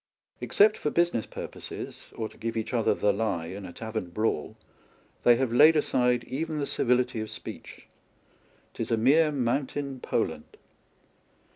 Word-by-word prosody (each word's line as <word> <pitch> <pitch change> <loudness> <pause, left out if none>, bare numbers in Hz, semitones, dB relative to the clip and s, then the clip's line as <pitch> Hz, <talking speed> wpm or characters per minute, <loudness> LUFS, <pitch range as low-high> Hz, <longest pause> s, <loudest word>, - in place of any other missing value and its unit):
Except 210 +1 +4
for 150 - 0
business 170 -10 +1
purposes, - - -8
or 110 - -3
to - - -17
give 115 0 -4
each 110 +3 -3
other 115 -3 +2
the 105 -1 +2
lie 100 -6 -1
in 95 +3 -7
a - - -9
tavern 110 -1 -5
braw^l, 105 -4 -1 0.7
they 120 - +7
have 125 -1 -1
laid 155 +6 +7
aside 125 -4 +2
even 155 +4 -3
the 145 - -1
civility 125 -3 +1
of 110 - -5
speech. - - -9 0.9
'Tis - - -4
a 115 - +2
mere 150 +7 +4
mountain 135 +1 -2
Poland. - - -3
120 Hz, 150 wpm, -27 LUFS, 110-145 Hz, 0.9 s, they